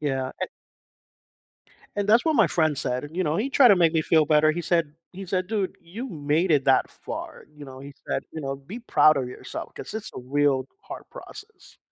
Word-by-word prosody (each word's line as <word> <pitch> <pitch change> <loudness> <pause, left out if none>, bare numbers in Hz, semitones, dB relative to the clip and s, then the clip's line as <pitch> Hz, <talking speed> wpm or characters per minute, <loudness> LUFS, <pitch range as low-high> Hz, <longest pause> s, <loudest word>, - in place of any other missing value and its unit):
Yeah, 135 -3 -1
and - - -1 1.5
And 205 0 -1
that's 230 +6 +5
what 320 - +2
my 220 -6 +6
friend 155 -2 +1
said, 125 +1 -2
and 155 +4 -10
you 185 - +1
know 150 +1 0
he 255 +7 -1
tried 265 -2 +6
to 200 - +6
make 170 -2 +4
me 160 -1 +2
feel 160 -1 +4
better, 155 +1 +4
he 175 +3 -3
said 165 -4 +1 0.2
he 190 +1 -8
said, 185 0 -1
"Dude, 205 -3 -2
you 220 +10 -7
made 155 +2 0
it 140 -3 +3
that 135 - +3
far," - - -8
you 145 - -10
know 130 -1 -11
he 140 +1 -10
said, - - -1
you 160 - -5
know, 135 -2 -3
"Be 155 - -9
proud 155 -10 +4
of 130 -2 -1
yourself 125 0 -8
'cause - - -8
it's 220 0 -5
a - - -6
real 135 0 +1
hard - - -9
process." 445 -3 -13
160 Hz, 220 wpm, -25 LUFS, 145-195 Hz, 1.5 s, my